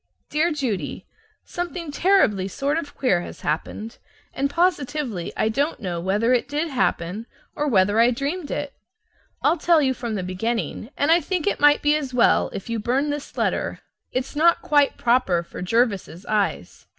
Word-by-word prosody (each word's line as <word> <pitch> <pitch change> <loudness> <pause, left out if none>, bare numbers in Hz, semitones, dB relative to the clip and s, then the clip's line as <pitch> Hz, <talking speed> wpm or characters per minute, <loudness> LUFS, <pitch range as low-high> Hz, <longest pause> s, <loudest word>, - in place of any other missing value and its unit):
Dear 315 +3 +2
Judy: 225 - -3 0.4
Something 345 -2 -5
terribly 290 - +3
sort 280 - -1
of 290 -3 -8
queer 190 -10 +2
has - - -9
happened, 210 +9 -4 0.3
and 275 +1 0
positively 290 - -1
I - - +2
don't 280 +8 0
know 175 -6 -3
whether 205 +7 +1
it 245 - +1
did 300 +3 -1
happen 220 - -1 0.3
or 295 - -1
whether 205 -3 +3
I 235 +1 +6
dreamed 285 +6 -3
it. 290 -1 -3 0.7
I'll 335 - +3
tell 335 0 +4
you 265 -3 +2
from 235 -3 -4
the 190 - -2
beginning, 220 +5 -3
and 290 +3 +2
I 340 +1 +5
think 360 -3 -2
it 410 - 0
might 295 0 +5
be 295 +1 +4
as 275 -4 -3
well 240 - +4
if 195 - -7
you 230 -1 -2
burned 270 +7 0
this 290 -1 -7
letter; - - -1 0.3
it's 255 +3 -3
not 335 +3 +3
quite 290 -2 +3
proper 235 -8 +2
for 170 - -9
Jervis's 200 -3 0
eyes. 210 -2 -2
255 Hz, 175 wpm, -23 LUFS, 210-295 Hz, 0.7 s, I